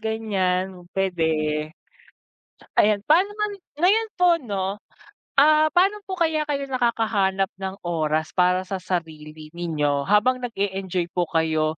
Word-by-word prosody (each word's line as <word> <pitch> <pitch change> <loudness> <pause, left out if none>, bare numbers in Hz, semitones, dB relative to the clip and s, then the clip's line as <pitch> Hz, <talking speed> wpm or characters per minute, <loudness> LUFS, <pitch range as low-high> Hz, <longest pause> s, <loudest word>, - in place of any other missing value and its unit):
ganyan 190 -5 -2
pwede. 190 -3 0 1.5
Ayan, 210 -1 +4
paano 370 +7 +4
naman 425 0 -2 0.3
ngayon 435 +5 +3
po 360 0 +5
'no, 200 -6 -2 0.7
ah, 310 +2 +6
paano 390 +4 +2
po 375 -1 -4
kaya 320 -3 +1
kayo 280 -1 -1
nakakahanap 220 -7 0
ng 190 0 -4
oras 155 -2 -1
para 180 0 +2
sa 190 -1 -5
sarili 155 -3 -5
ninyo 150 -5 -1
habang 250 +5 +3
nag-e-enjoy 195 -6 -2
po 175 -3 -1
kayo 160 -1 0
195 Hz, 120 wpm, -23 LUFS, 175-255 Hz, 1.5 s, ah